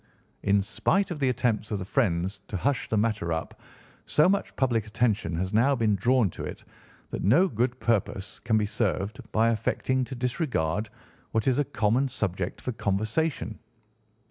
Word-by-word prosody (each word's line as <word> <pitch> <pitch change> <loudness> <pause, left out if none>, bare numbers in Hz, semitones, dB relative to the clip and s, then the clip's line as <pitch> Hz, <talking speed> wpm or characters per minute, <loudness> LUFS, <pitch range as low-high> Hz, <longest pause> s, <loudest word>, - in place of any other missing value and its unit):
In 100 0 +3
spite 190 - +1
of 160 - -4
the 135 -2 +2
attempts 120 -4 0
of 105 - -1
the 95 - -5
friends 95 -5 0
to 100 - -3
hush 135 +6 0
the 110 - +1
matter 105 -5 0
up, 80 0 -4 0.5
so 150 - +4
much 200 +1 0
public 115 -5 +1
attention 105 -6 0
has 95 +4 -2
now 130 +6 +4
been 110 -4 +2
drawn 120 +3 +3
to - - -7
it - - -6 0.5
that - - -3
no 145 - +5
good 125 - -1
purpose 100 -3 -1
can 110 - +1
be 105 - +2
served 105 -1 -1
by 115 +1 +3
affecting 130 +3 0
to 130 - -7
disregard 120 - -1 0.4
what 110 +1 +1
is 130 +1 +3
a - - +4
common 120 +5 +1
subject 95 -7 -3
for 125 - -2
conversation. 110 +5 -1
110 Hz, 170 wpm, -27 LUFS, 100-130 Hz, 0.5 s, no